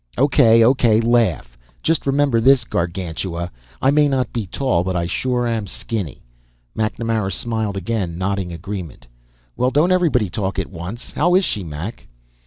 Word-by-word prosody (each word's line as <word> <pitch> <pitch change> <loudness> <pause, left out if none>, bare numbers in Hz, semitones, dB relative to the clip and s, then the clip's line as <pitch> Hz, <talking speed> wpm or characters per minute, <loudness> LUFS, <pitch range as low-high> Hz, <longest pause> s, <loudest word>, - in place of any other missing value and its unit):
"O.K., 115 -4 +5
O.K. 120 -3 +4
Laugh. 115 - +1 0.3
Just 160 -3 +1
remember 135 -4 +2
this, 130 0 +5
Gargantua; 85 -2 -3 0.3
I 135 - +5
may 150 0 +4
not 135 -2 -1
be 115 -5 -3
tall, 110 -5 0
but 95 0 -2
I 85 -1 0
sure 125 +7 -1
am 115 -3 -1
skinny." 95 - -5 0.5
MacNamara 110 -2 -1
smiled 110 -3 -2
again, 95 -4 -2
nodding 95 -1 -2
agreement. 90 -2 -7 0.5
"Well, 125 - +2
don't 150 +7 +2
everybody 160 - +2
talk 95 +2 -3
at - - -3
once. 95 +7 -7
How 175 +3 +2
is 190 0 +4
she, 100 - -2
Mac?" 85 +8 -7
110 Hz, 155 wpm, -20 LUFS, 90-125 Hz, 0.5 s, O.K